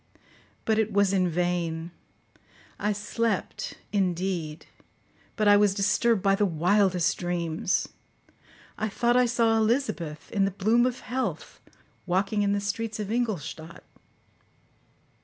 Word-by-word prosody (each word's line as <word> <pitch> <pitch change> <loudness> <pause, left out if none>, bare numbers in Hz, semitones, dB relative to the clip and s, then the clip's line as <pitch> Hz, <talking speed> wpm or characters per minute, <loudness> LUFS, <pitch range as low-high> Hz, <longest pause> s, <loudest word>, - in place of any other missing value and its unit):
But 220 -1 +2
it 220 0 +1
was 200 -1 +2
in 185 -2 +2
vain; 170 -1 -1 0.9
I 210 - 0
slept, 210 0 -2 0.2
indeed, 180 -5 -1 0.7
but 215 -2 +1
I 205 - +8
was 205 -1 +3
disturbed 210 +1 +2
by 195 -1 +4
the 200 +1 +1
wildest 180 0 +2
dreams. 175 -1 -1 0.9
I 220 - -1
thought 240 +4 +1
I 250 0 +4
saw 230 -1 +2
Elizabeth, 215 - -1
in 195 -2 +2
the - - +1
bloom 220 +6 +2
of 250 -1 -4
health, 255 +1 -4 0.5
walking 195 +3 +1
in 200 -1 +2
the 205 - +1
streets 215 +2 -3
of 210 0 -4
Ingolstadt. 175 - -3
200 Hz, 125 wpm, -27 LUFS, 180-220 Hz, 0.9 s, I